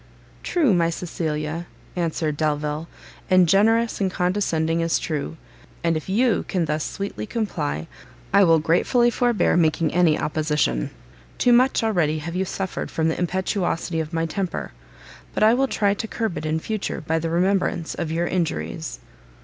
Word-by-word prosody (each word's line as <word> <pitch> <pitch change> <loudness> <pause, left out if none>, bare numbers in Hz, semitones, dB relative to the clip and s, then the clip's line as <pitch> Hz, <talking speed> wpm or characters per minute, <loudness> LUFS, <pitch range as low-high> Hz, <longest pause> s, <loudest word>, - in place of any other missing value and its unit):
"True, 305 - +2
my 170 -2 +3
Cecilia," 160 -1 -3 0.3
answered 165 -3 -1
Delvile, 150 +1 -1 0.4
"and 185 -1 +5
generous 225 +5 +3
and 190 - +2
condescending 180 -3 0
as 165 0 +2
true; 155 0 -3 0.5
and 165 -1 +2
if 155 +3 -4
you 225 +1 +2
can 180 -3 0
thus 155 0 -1
sweetly 195 - -5
comply, 80 - -2 0.5
I 200 0 +7
will 165 -3 +5
gratefully 180 +10 +3
forbear 240 -2 +2
making 160 -2 +2
any 170 -3 +4
opposition. 150 - 0 0.5
Too 245 - +4
much 255 0 +4
already 175 -8 +1
have 165 +3 -5
you 190 +1 0
suffered 190 0 -4
from 160 0 0
the 160 - -2
impetuosity 180 -2 -1
of 160 0 -3
my 165 -1 0
temper, 180 +3 -3 0.6
but - - +2
I 220 +1 +6
will 270 +2 +2
try 205 -5 +1
to 215 +2 -4
curb 220 -5 -2
it 155 - -4
in 155 +1 0
future 215 0 -3
by 160 +1 0
the 165 0 -2
remembrance 180 -1 +1
of 165 -2 -3
your 170 +2 0
injuries." 170 -2 -2
170 Hz, 160 wpm, -23 LUFS, 160-200 Hz, 0.6 s, I